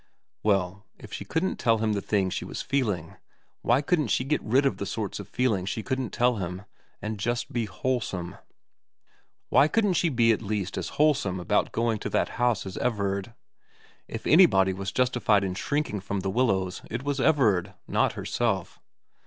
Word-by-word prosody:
Well, 100 -1 0
if - - -12
she - - -4
couldn't 170 +4 -1
tell 115 -1 +3
him 110 0 0
the 100 - -1
things 95 -3 0
she - - -3
was - - -5
feeling, 105 - -1 0.4
why 140 - +2
couldn't 155 -3 +1
she 115 - +1
get 150 +3 0
rid 130 +6 +2
of 135 - +1
the 100 - -4
sorts 105 -3 -3
of 100 - -8
feelings 110 -7 0
she 110 +3 -3
couldn't 130 -2 -2
tell 120 -1 +2
him, 90 0 -4 0.4
and 105 0 -4
just 120 +4 -2
be 120 -2 0
wholesome? 105 -8 -3 1.1
Why 145 - +5
couldn't 205 +2 +2
she 170 0 +2
be 120 -4 +3
at 110 - 0
least 105 -3 -3
as - - -3
wholesome 140 -12 +2
about 90 - +1
going 115 -1 0
to - - -4
that - - +1
house 120 -6 +2
as 95 - -6
Everard? 100 -1 -1 0.7
If 115 - -7
anybody 95 - +5
was 95 0 -4
justified 125 -5 +2
in 95 -1 -2
shrinking 140 +1 -2
from 100 +1 -3
The 95 - -2
Willows 95 -6 0
it 115 +3 -4
was 140 -1 -1
Everard, 105 - +2
not - - +1
herself. 105 -7 -2
110 Hz, 180 wpm, -27 LUFS, 95-130 Hz, 1.1 s, Why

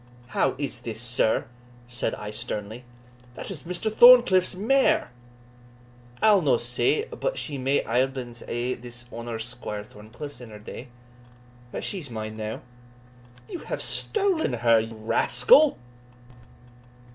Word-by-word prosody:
"How 130 +1 +1
is 140 0 -4
this, 110 -2 -6
sir?" 120 -1 +1 0.4
said 120 -2 -2
I 105 0 -7
sternly; 105 +3 -6 0.5
"that - - -7
is 165 -7 -5
Mr. 180 +5 -2
Thorncliff's 240 -8 +7
mare!" 265 +8 +2 1.1
"I'll 210 -3 +6
no 135 -6 +3
say 120 - +1
but - - -4
she 145 -3 -3
may 135 +2 +1
aiblins 125 0 -1
hae 120 +2 -2
been 120 - -11
his 120 0 -9
honour's 115 -1 -5
Squire 115 -4 -5
Thorncliff's 115 +7 -10
in 120 - -10
her 105 - -10
day 110 +4 -9 0.8
but - - -5
she's 180 -9 -4
mine 110 -2 -6
now." 110 0 -5 0.9
"You 350 - -6
have - - -4
stolen 390 - 0
her, 115 -1 +4
you 110 +1 -5
rascal." 300 - +4
125 Hz, 135 wpm, -25 LUFS, 115-180 Hz, 1.1 s, Thorncliff's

